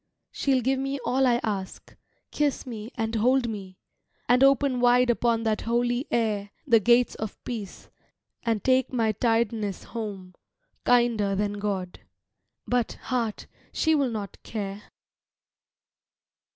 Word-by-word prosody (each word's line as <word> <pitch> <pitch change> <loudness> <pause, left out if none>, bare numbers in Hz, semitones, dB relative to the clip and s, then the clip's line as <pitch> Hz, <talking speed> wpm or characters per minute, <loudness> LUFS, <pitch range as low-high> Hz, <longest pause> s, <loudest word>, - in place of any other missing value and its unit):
She'll 265 -3 +1
give 265 +2 +1
me 275 +1 -2
all 265 +1 +2
I 240 -1 +3
ask, 195 -3 -4 0.4
kiss 295 -3 0
me 225 -3 -7
and 225 0 -2
hold 245 +3 +2
me, 195 -4 -7 0.5
And 250 +2 +5
open 275 -1 +4
wide 245 0 +4
upon 230 -1 +1
that 220 -1 0
holy 240 +3 0
air 215 -3 0 0.2
The 235 -5 +5
gates 240 +3 +4
of 220 -1 -6
peace, 215 -6 -7 0.5
and 225 -4 -1
take 260 0 +2
my 230 -4 +1
tiredness 225 -2 0
home, 200 -5 -6 0.5
Kinder 235 -5 +3
than 205 +1 -1
God. 195 -3 -3 0.7
But, 245 -2 0
heart, 235 -4 -3 0.3
she 320 - +2
will 280 -4 +2
not 210 -4 -6
care. 200 -2 -5
230 Hz, 130 wpm, -26 LUFS, 210-250 Hz, 0.7 s, And